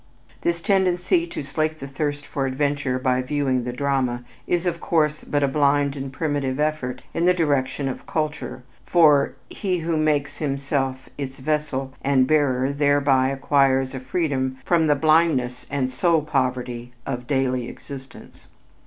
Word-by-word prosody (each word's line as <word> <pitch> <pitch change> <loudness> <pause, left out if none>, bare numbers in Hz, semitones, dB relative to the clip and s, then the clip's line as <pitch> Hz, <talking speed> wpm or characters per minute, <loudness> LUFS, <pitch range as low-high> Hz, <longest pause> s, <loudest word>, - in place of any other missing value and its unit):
This 170 0 0
tendency 190 - +2
to - - -5
slake 155 +3 -1
the 135 - -7
thirst 145 +1 -3
for 135 -2 -2
adventure 140 -1 0
by 130 0 +1
viewing 130 -2 0
the 125 - -2
drama 125 -2 -1 0.2
is, 175 0 0
of 170 -2 -1
course, 150 -2 +1
but 145 -1 0
a - - +4
blind 140 0 +2
and 135 -1 -5
primitive 145 -2 -2
effort 150 -5 -1
in 170 - 0
the 180 0 +5
direction 140 -4 0
of 130 - -5
culture, 155 -4 -3 0.2
for 150 -5 +4
"he 185 -3 -2
who 165 -1 -1
makes 145 -2 +1
himself 135 -2 -2
its 135 -1 -5
vessel 135 -2 -2
and 135 -2 +4
bearer 135 -3 +2
thereby 140 -2 +3
acquires 135 -1 +2
a 130 - -4
freedom 130 -2 -1
from 165 -2 +3
the 145 - +4
blindness 155 -5 +2
and 135 -2 -1
soul 160 +3 +2
poverty 125 -3 -2
of 125 -2 -4
daily 130 -3 0
existence." 135 -2 -11
140 Hz, 155 wpm, -23 LUFS, 130-155 Hz, 0.2 s, the